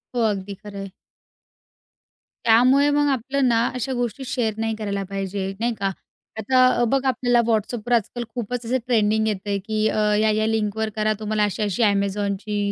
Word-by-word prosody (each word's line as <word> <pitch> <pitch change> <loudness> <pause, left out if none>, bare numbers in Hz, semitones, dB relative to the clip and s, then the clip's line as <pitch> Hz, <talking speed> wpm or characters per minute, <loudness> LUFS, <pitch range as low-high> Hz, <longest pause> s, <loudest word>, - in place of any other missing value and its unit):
हो. 240 - +1
अगदी 200 0 -4
खरंय. 200 -1 -7 1.6
त्यामुळे 255 +6 +5
मग 290 0 +2
आपलं 270 +1 0
ना 235 -1 +3
अशा 255 +2 -2
गोष्टी 245 +1 -3
शेअर 225 -5 -1
नाही 225 0 -1
करायला 200 -2 -3
पाहिजे, 195 0 -3
नाही 235 0 0
का, 195 - 0 0.5
आता 255 +4 +4 0.2
अ, - - +4
बघा 270 0 +1
आपल्याला 245 -1 +2
WhatsAppवर 225 +1 -1
आजकाल 240 +1 0
खूपच 245 0 -4
असं 255 +3 +1
ट्रेंडिंग 220 -2 +2
येतंय 205 -1 -2
की 215 0 0
अ, - - -2 0.2
या-या 215 0 +2
लिंकवर 220 0 -1
करा, 215 0 +1
तुम्हाला 215 0 0
अशी-अशी 205 +1 0
Amazonची, 200 0 0
220 Hz, 155 wpm, -23 LUFS, 205-245 Hz, 1.6 s, त्यामुळे